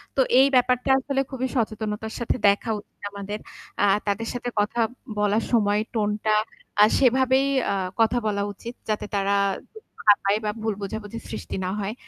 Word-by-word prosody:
তো 270 Hz, -, +4 dB, 0.2 s
এই 270 Hz, -, +7 dB
ব্যাপারটা 250 Hz, +1 st, +2 dB
আসলে 270 Hz, 0 st, -1 dB
খুবই 260 Hz, -1 st, -2 dB
সচেতনতার 220 Hz, -2 st, -2 dB
সাথে 235 Hz, -, 0 dB
দেখা 200 Hz, +3 st, +2 dB
উচিত 205 Hz, -, -19 dB
আমাদের। 200 Hz, +1 st, -5 dB, 0.4 s
আ -, -, +6 dB, 0.2 s
তাদের 205 Hz, +3 st, -1 dB
সাথে 245 Hz, 0 st, -3 dB
কথা 210 Hz, +3 st, +1 dB, 0.4 s
বলার 210 Hz, +2 st, +2 dB
সময় 210 Hz, -3 st, +3 dB
টোন 215 Hz, -3 st, +1 dB, 0.2 s
টা 215 Hz, -, +4 dB, 0.5 s
আ -, -, +10 dB, 0.2 s
সেভাবেই 260 Hz, +1 st, +4 dB, 0.2 s
আ -, -, +1 dB, 0.3 s
কথা 225 Hz, +2 st, +3 dB
বলা 200 Hz, -1 st, 0 dB
উচিত 235 Hz, +4 st, -8 dB, 0.2 s
যাতে 215 Hz, -1 st, -1 dB
তারা 200 Hz, 0 st, +1 dB, 0.4 s
দুঃখ 440 Hz, -1 st, -14 dB, 0.2 s
না 205 Hz, -, +10 dB
পায় 200 Hz, +1 st, +3 dB
বা 210 Hz, -, +1 dB
ভুল 220 Hz, -1 st, 0 dB
বোঝাবুঝি 210 Hz, +2 st, -5 dB
সৃষ্টি -, -, -5 dB
না -, -, -1 dB
হয়। 205 Hz, +1 st, -2 dB
220 Hz, 175 wpm, -24 LUFS, 205-245 Hz, 0.5 s, আ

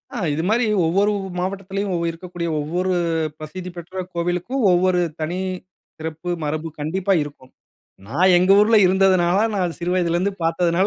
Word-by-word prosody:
ஆ -, -, -3 dB, 0.2 s
இது 160 Hz, +3 st, -2 dB
மாதிரி 235 Hz, +2 st, +2 dB, 0.2 s
ஒவ்வொரு 200 Hz, +5 st, +2 dB, 0.3 s
மாவட்டத்திலயும் 195 Hz, +1 st, -3 dB
இருக்கக்கூடிய, 170 Hz, 0 st, -5 dB
ஒவ்வொரு 175 Hz, +5 st, -1 dB, 0.5 s
பிரசித்தி 180 Hz, +4 st, -7 dB
பெற்ற 185 Hz, +2 st, -6 dB
கோவிலுக்கும், 175 Hz, +10 st, -2 dB
ஒவ்வொரு 180 Hz, 0 st, +3 dB, 0.2 s
தனி 175 Hz, +4 st, -2 dB, 0.6 s
சிறப்பு 160 Hz, +2 st, -6 dB
மரபு 155 Hz, +2 st, -2 dB
கண்டிப்பா 185 Hz, +6 st, 0 dB
இருக்கும். 140 Hz, -3 st, -12 dB, 0.6 s
நான் 180 Hz, +9 st, +3 dB
எங்கள் 190 Hz, +3 st, +5 dB
ஊருல 220 Hz, +2 st, +5 dB
இருந்ததுனால, 185 Hz, -1 st, +3 dB, 0.2 s
நான் 180 Hz, -3 st, -1 dB
சிறு 175 Hz, +1 st, -1 dB
வயதிலருந்து 180 Hz, +2 st, +1 dB
பார்த்ததுனால, 170 Hz, +3 st, +2 dB
180 Hz, 130 wpm, -21 LUFS, 165-190 Hz, 0.6 s, எங்கள்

